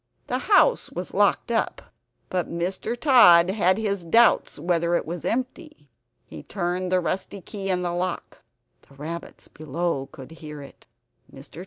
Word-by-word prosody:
The - - -2
house - - +4
was - - -6
locked - - +2
up, - - -2 0.4
but 180 -3 -2
Mr. 185 +7 -3
Tod 185 - +6
had 190 -2 +2
his 200 -4 -2
doubts 230 +8 +3
whether 170 +1 0
it - - -1
was 170 +1 -6
empty. 255 - -4 0.3
He - - -10
turned 180 -1 -3
the 185 - +3
rusty 190 +3 -3
key 195 +2 -6
in 180 -1 0
the 175 -1 -2
lock; 180 0 -4 0.5
the 140 - -18
rabbits 165 +4 -8
below 155 -2 -3
could 135 0 -12
hear 155 -2 -10
it. 140 -1 -14 0.4
Mr. 135 +4 -13
175 Hz, 155 wpm, -24 LUFS, 165-195 Hz, 0.5 s, Tod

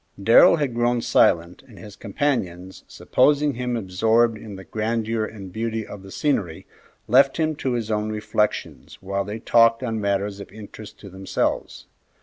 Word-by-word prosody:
Darrell 115 +10 +6
had 145 -6 -2
grown 120 +1 +1
silent, 85 +1 +2
and 115 -5 -16
his 100 +3 -12
companions, 95 -7 -3
supposing 145 +2 +1
him 125 -1 -3
absorbed 110 +4 +1
in 105 -1 -10
the 95 - -10
grandeur 110 +3 -2
and 100 -4 -10
beauty 110 0 -3
of 105 - -10
the 95 - -13
scenery, 95 - -2 0.4
left 135 +3 +4
him 155 -1 0
to 130 - -2
his 115 -2 -3
own 105 0 -1
reflections 105 0 -3
while 100 +1 -2
they 105 +2 -6
talked 115 +1 +3
on 115 -3 -3
matters 100 0 -1
of 100 - -10
interest 110 0 -12
to 100 - -10
themselves. 95 +1 -3
110 Hz, 160 wpm, -22 LUFS, 100-120 Hz, 0.4 s, Darrell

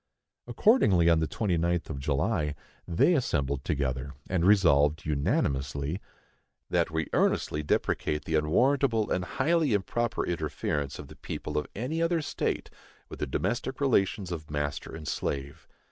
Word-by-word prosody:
Accordingly, 95 - +4
on 80 - +4
the 80 - 0
29th 85 -4 0
of 70 - -5
July, 75 +2 0 0.3
they 90 - +3
assembled 70 - 0
together, 70 -1 -2
and 90 -2 0
Resolved, 80 -6 +4
unanimously, 70 +2 -1 0.7
That - - +2
we 80 0 -1
earnestly 75 - +1
deprecate 75 0 0
the 80 - -3
unwarrantable 115 - +2
and 90 - +1
highly 150 - +1
improper 120 +4 -1
interference 75 -4 -2
of - - -9
the - - -13
people 75 - -6
of 75 - 0
any 135 +10 -2
other 165 -1 +1
state - - -2 0.4
with - - -9
the - - -2
domestic 120 - -2
relations 100 -8 +1
of 75 -3 -6
master 75 0 -3
and 80 -2 -8
slave. 70 0 -3
80 Hz, 140 wpm, -28 LUFS, 75-110 Hz, 0.7 s, Accordingly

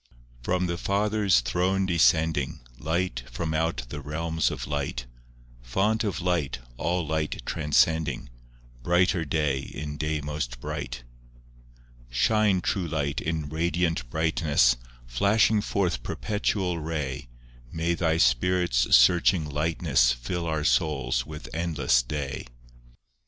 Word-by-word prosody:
I - - -29 0.3
From 90 0 +1
the 85 -1 -3
Father's 100 - +2
throne 90 +10 0
descending, 80 -4 +2 0.2
Light 80 -4 -1
from 80 +6 -3
out 80 -4 0
the 75 +2 -6
realms 80 +2 -1
of - - -5
light; 70 -4 -3 0.6
Font 100 - 0
of 95 -6 -2
light, 85 -7 0 0.2
all 90 +3 -1
light 80 0 -2
transcending, 75 -2 +1 0.5
Brighter 90 +3 +2
day 75 -3 0
in 75 +2 -6
day 75 0 -1
most 75 -5 -4
bright. - - -5 0.6
II - - -27 0.3
Shine, 95 - +2
True 95 -2 -1
Light, 75 -2 -2
in 80 -2 -2
radiant 80 -4 -1
brightness, 75 -5 +2 0.3
Flashing 100 - +3
forth 90 - -1
perpetual 95 - -1
ray; 75 -6 -4 0.4
May 85 +1 0
Thy 80 -2 +1
Spirit's 60 0 +3
searching 85 +5 +4
lightness, 75 -5 +2
Fill 85 +8 -4
our 80 -1 -1
souls 70 -6 +1
with 75 -1 -8
endless 80 -7 +2
day. 70 +2 -5
80 Hz, 120 wpm, -26 LUFS, 70-90 Hz, 0.6 s, searching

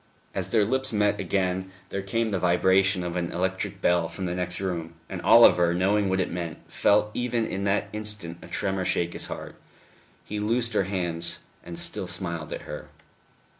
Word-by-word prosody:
As 95 -1 -3
their 110 -2 +3
lips 130 +4 +1
met 105 -1 +2
again 95 0 -1 0.2
there 100 - -3
came 115 +3 -1
the 95 - 0
vibration 95 +2 +3
of 85 -1 -4
an 85 -1 -1
electric 95 +2 -2
bell 85 -1 +3
from 85 +3 -6
the 90 - -2
next 90 0 -2
room, 85 -4 -3
and - - -5
Oliver, 85 -1 +6
knowing 100 +2 +2
what 95 0 +1
it 90 - 0
meant, 85 -2 -4
felt 105 +1 +2
even 120 -2 0
in 100 -1 -3
that 100 +1 +1
instant 105 -6 -3
a - - -11
tremor 95 -1 -1
shake 85 -1 0
his - - -3
heart. - - -7 0.7
He 105 - -4
loosed 115 +2 0
her 100 - +2
hands, 85 -3 -1 0.3
and 85 0 -7
still 95 - 0
smiled 85 -3 -3
at - - -4
her. - - -8
95 Hz, 185 wpm, -26 LUFS, 85-105 Hz, 0.7 s, Oliver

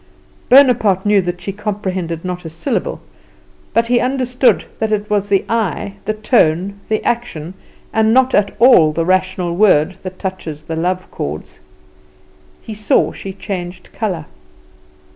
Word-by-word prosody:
Bonaparte 245 -8 +5
knew 205 -1 +4
that 175 0 -4
she 195 - -4
comprehended 190 -5 -4
not 180 -1 -4
a 165 - -6
syllable; 245 - -3 0.7
but 230 0 +2
he 240 +1 +2
understood 255 0 +1
that 220 -1 -1
it 210 0 -1
is 205 -1 0
the 195 -1 +2
eye, 215 -3 -1
the 215 - 0
tone, 200 -3 +1
the 215 - 0
action, 185 -9 -2 0.4
and 220 0 +3
not 260 +2 +3
at 200 -1 +2
all 215 -11 +6
the 165 +2 -1
rational 185 -1 0
word, 185 -3 +3
that 185 0 -7
touches 165 -6 -6
the 160 - -5
love 180 +3 -2
chords. 75 +2 -6 1.0
He 220 - -7
saw 210 0 +1
she 195 - -7
changed 185 -2 -7
colour. 190 -8 -3
195 Hz, 145 wpm, -17 LUFS, 175-220 Hz, 1.0 s, all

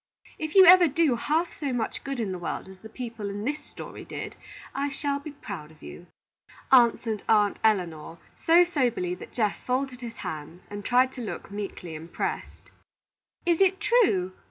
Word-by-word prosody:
If 310 +2 -4
you 380 -1 +10
ever 360 0 +9
do 295 -2 +2
half 315 +8 0
so 285 -3 -3
much 240 -3 -3
good 275 -2 -4
in 215 -4 -1
the 185 - -4
world 175 - -4
as 190 0 -13
the 220 - -11
people 230 -3 -6
in 205 +2 -5
this 295 +3 -1
story - - -9
did, - - -7 0.4
I 280 +1 -1
shall 280 0 -2
be 305 - -8
proud 200 - -8
of 155 -1 -19
you," 175 - -10 0.6
answered 235 -4 +4
Aunt 210 -2 +4
Elinor, 170 -7 0 0.2
so 340 +2 +5
soberly 245 - 0
that 180 - -9
Geoff 215 -4 -1
folded 255 0 -2
his 230 -1 -7
hands, 160 +3 -6
and 205 0 -6
tried 255 +3 +3
to 255 - -8
look 220 - -6
meekly 200 -4 -6
impressed. 160 +2 -5 0.7
"Is 345 0 +2
it 385 0 +4
true?" 285 - +3
235 Hz, 180 wpm, -27 LUFS, 195-285 Hz, 0.7 s, you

